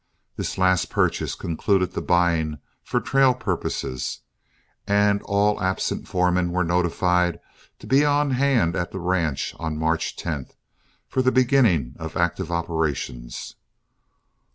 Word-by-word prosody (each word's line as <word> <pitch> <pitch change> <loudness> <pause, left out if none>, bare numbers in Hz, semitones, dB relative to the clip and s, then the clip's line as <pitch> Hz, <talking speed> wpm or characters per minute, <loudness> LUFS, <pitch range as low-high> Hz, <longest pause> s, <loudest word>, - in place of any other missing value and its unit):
This - - -4
last 95 -1 +2
purchase - - 0
concluded 90 +2 0
the 95 - -4
buying 85 -3 +1 0.2
for 125 - -1
trail 135 0 +3
purposes, 90 - -3 0.7
and 100 0 +3
all 100 +1 +1
absent 95 0 -1
foremen 90 -1 +1
were 90 +1 +1
notified 90 0 +1 0.4
to - - -13
be 135 +2 +4
on 145 -1 +2
hand 125 -10 +2
at 90 - -2
the - - -6
ranch 85 -5 -1
on 80 -2 -3
March 80 +1 -1
10, 75 -6 -4 0.6
for 130 - 0
the 130 0 +3
beginning 120 - +3
of 80 -1 -6
active 85 +1 0
operations. 80 -8 -3
90 Hz, 130 wpm, -23 LUFS, 80-105 Hz, 0.7 s, be